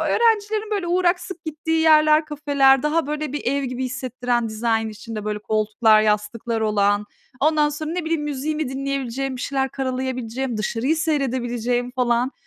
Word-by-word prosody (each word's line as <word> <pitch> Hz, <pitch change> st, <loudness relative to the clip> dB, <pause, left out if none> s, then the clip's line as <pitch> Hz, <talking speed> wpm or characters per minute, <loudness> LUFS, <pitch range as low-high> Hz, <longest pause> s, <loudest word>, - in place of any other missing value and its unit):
öğrencilerin 435 Hz, -2 st, +1 dB
böyle 390 Hz, -4 st, -1 dB
uğrak, 355 Hz, 0 st, +2 dB
sık 370 Hz, -2 st, -9 dB
gittiği 320 Hz, +1 st, -1 dB
yerler, 310 Hz, 0 st, +5 dB
kafeler, 280 Hz, -3 st, +3 dB
daha 300 Hz, 0 st, +1 dB
böyle 300 Hz, -1 st, -3 dB
bir 295 Hz, -, -3 dB
ev 280 Hz, +3 st, 0 dB
gibi 255 Hz, 0 st, -3 dB
hissettiren, 250 Hz, -2 st, -2 dB
dizayn 225 Hz, 0 st, 0 dB
içinde 215 Hz, 0 st, -7 dB
böyle 210 Hz, 0 st, -2 dB
koltuklar, 215 Hz, +1 st, +3 dB
yastıklar 215 Hz, +2 st, -1 dB
olan, 205 Hz, -1 st, +2 dB, 0.3 s
ondan 300 Hz, 0 st, +3 dB
sonra, 305 Hz, +1 st, -5 dB
ne 350 Hz, -1 st, -3 dB
bileyim 320 Hz, -2 st, -1 dB
müziğimi 295 Hz, 0 st, -2 dB
dinleyebileceğim, 270 Hz, -1 st, -3 dB
bir 250 Hz, -, -6 dB
şeyler 270 Hz, -1 st, -1 dB
karalayabileceğim, 255 Hz, -2 st, -3 dB
dışarıyı 235 Hz, +8 st, 0 dB
seyredebileceğim, 245 Hz, -5 st, -1 dB
falan, 245 Hz, 0 st, +1 dB
265 Hz, 150 wpm, -22 LUFS, 235-305 Hz, 0.3 s, yerler